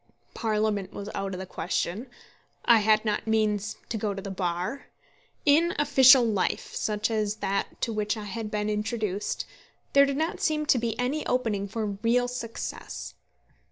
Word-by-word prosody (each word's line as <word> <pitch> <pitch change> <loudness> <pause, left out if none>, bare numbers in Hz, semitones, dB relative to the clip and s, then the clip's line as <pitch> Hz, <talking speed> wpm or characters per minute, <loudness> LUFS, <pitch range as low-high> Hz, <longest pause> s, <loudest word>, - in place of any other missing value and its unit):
Parliament 215 -3 -1
was 200 +1 -6
out 195 -1 -3
of - - -6
the 190 - -5
question. 185 +6 -3 0.6
I 235 -2 +7
had 215 +1 +3
not 215 0 -1
means 215 -1 +1
to 225 - -2
go 205 -1 -1
to 195 - -5
the 195 - -5
Bar. 185 +7 -3 0.6
In 320 +4 +4
official 270 -3 +7
life, 205 -5 -1
such 215 +1 -1
as 215 -1 0
that 200 -2 -2
to 230 - 0
which 210 +1 -1
I 215 - -5
had 215 +1 -5
been 210 0 -1
introduced, 210 -1 -2 0.5
there 280 0 +7
did 280 0 -1
not 320 +2 -1
seem 305 -1 +1
to 260 - +4
be 230 -1 -2
any 260 +5 -1
opening 220 -6 0
for 220 +2 -3
real 230 +5 +1
success. 245 -2 -6
215 Hz, 165 wpm, -27 LUFS, 205-245 Hz, 0.6 s, I